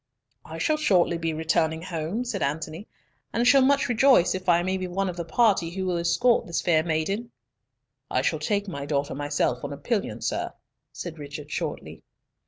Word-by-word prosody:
"I 160 Hz, +1 st, -8 dB
shall 305 Hz, -, +1 dB
shortly 180 Hz, -, +2 dB
be 165 Hz, -1 st, -1 dB
returning 160 Hz, 0 st, 0 dB
home," 175 Hz, +7 st, -3 dB
said 225 Hz, -6 st, -3 dB
Antony, 160 Hz, +6 st, -3 dB, 0.4 s
"and 235 Hz, -, 0 dB
shall 275 Hz, +2 st, +7 dB
much 275 Hz, +1 st, +3 dB
rejoice 245 Hz, -5 st, +4 dB
if 185 Hz, 0 st, -3 dB
I 175 Hz, 0 st, +4 dB
may 185 Hz, +1 st, 0 dB
be 185 Hz, -1 st, -3 dB
one 190 Hz, +2 st, -1 dB
of 180 Hz, -, -5 dB
the 175 Hz, -, -3 dB
party 190 Hz, -1 st, +2 dB
who 190 Hz, +2 st, -4 dB
will 180 Hz, -1 st, 0 dB
escort 175 Hz, +8 st, +2 dB
this 170 Hz, -, -1 dB
fair 160 Hz, -3 st, +3 dB
maiden." 175 Hz, +8 st, -1 dB, 0.8 s
"I -, -, 0 dB
shall -, -, 0 dB
take 205 Hz, -1 st, -1 dB
my 140 Hz, -6 st, -5 dB
daughter 140 Hz, -1 st, -1 dB
myself 145 Hz, +1 st, -1 dB
on 145 Hz, -, -4 dB
a -, -, -7 dB
pillion, 205 Hz, -, -2 dB
sir," -, -, -2 dB, 0.4 s
said 165 Hz, -3 st, -7 dB
Richard, 145 Hz, 0 st, -8 dB
shortly. -, -, -4 dB
175 Hz, 190 wpm, -26 LUFS, 160-205 Hz, 0.8 s, shall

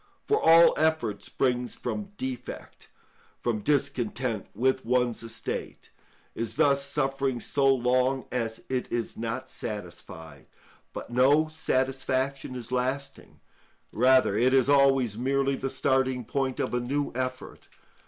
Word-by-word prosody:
For 430 Hz, -, +1 dB
all 165 Hz, +1 st, +7 dB
effort 155 Hz, -10 st, 0 dB
springs 125 Hz, -1 st, -1 dB
from 205 Hz, -1 st, -5 dB
defect—from 120 Hz, -2 st, -7 dB
discontent 125 Hz, -3 st, -1 dB
with 130 Hz, +4 st, +1 dB
one's 125 Hz, -1 st, 0 dB
estate—is 115 Hz, 0 st, -7 dB
thus 140 Hz, -2 st, +3 dB
suffering 135 Hz, -2 st, -1 dB
so 135 Hz, +3 st, +2 dB
long 130 Hz, +1 st, +1 dB
as 115 Hz, -2 st, -3 dB
it 130 Hz, -1 st, -3 dB
is 120 Hz, -1 st, -2 dB
not 115 Hz, +3 st, -4 dB
satisfied; 85 Hz, -, -8 dB, 0.4 s
but -, -, -8 dB
no 140 Hz, +6 st, +4 dB
satisfaction 135 Hz, -2 st, -1 dB
is 120 Hz, -1 st, -7 dB
lasting, 130 Hz, +2 st, -3 dB, 0.5 s
rather 130 Hz, -2 st, +4 dB
it 125 Hz, +4 st, +3 dB
is 130 Hz, -1 st, +4 dB
always 135 Hz, -6 st, +3 dB
merely 135 Hz, +2 st, +1 dB
the 135 Hz, -, -3 dB
starting 130 Hz, -2 st, 0 dB
point 135 Hz, +1 st, -2 dB
of -, -, -2 dB
a 125 Hz, -, +1 dB
new 140 Hz, +4 st, -2 dB
effort. 130 Hz, +1 st, -5 dB
130 Hz, 120 wpm, -27 LUFS, 120-135 Hz, 0.5 s, all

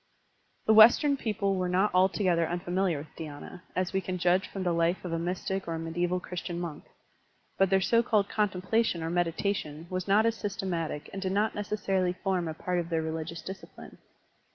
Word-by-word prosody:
The 220 Hz, -, +5 dB
Western 240 Hz, +6 st, +7 dB
people 210 Hz, -6 st, -1 dB
were 180 Hz, -1 st, -1 dB
not 185 Hz, +3 st, +2 dB
altogether 185 Hz, -2 st, +3 dB
unfa 175 Hz, +1 st, -4 dB
miliar 185 Hz, -4 st, +1 dB
with 145 Hz, +2 st, -10 dB
dhySna, 155 Hz, +3 st, -8 dB
as 185 Hz, +1 st, -1 dB
we 190 Hz, -, +1 dB
can 185 Hz, -1 st, -3 dB
judge 180 Hz, +2 st, +2 dB
from 195 Hz, -, -5 dB
the 175 Hz, -2 st, +1 dB
life 170 Hz, +2 st, +1 dB
of 170 Hz, -, -3 dB
a 165 Hz, -, 0 dB
mystic 185 Hz, +2 st, -3 dB
or 165 Hz, -, -2 dB
a -, -, -4 dB
medieval 175 Hz, +2 st, -1 dB
Christian 175 Hz, -1 st, -5 dB
monk. 170 Hz, -4 st, -6 dB, 0.7 s
But 195 Hz, -1 st, +4 dB
their 190 Hz, 0 st, +3 dB
so 230 Hz, +4 st, +3 dB
called 215 Hz, -3 st, +2 dB
contemplation 205 Hz, -2 st, 0 dB
or 165 Hz, -, -2 dB
meditation 170 Hz, -2 st, -1 dB
was 185 Hz, 0 st, -3 dB
not 205 Hz, +3 st, +4 dB
as 230 Hz, -, +3 dB
systematic 175 Hz, -8 st, -3 dB
and 195 Hz, -, -5 dB
did 190 Hz, -1 st, -1 dB
not 210 Hz, +2 st, +1 dB
necessarily 195 Hz, -3 st, -1 dB
form 185 Hz, -2 st, -1 dB
a 160 Hz, -, -4 dB
part 180 Hz, +2 st, -1 dB
of 170 Hz, -1 st, -4 dB
their 165 Hz, -1 st, 0 dB
religious 160 Hz, +1 st, -4 dB
discipline. 190 Hz, 0 st, -10 dB
180 Hz, 195 wpm, -29 LUFS, 170-195 Hz, 0.7 s, Western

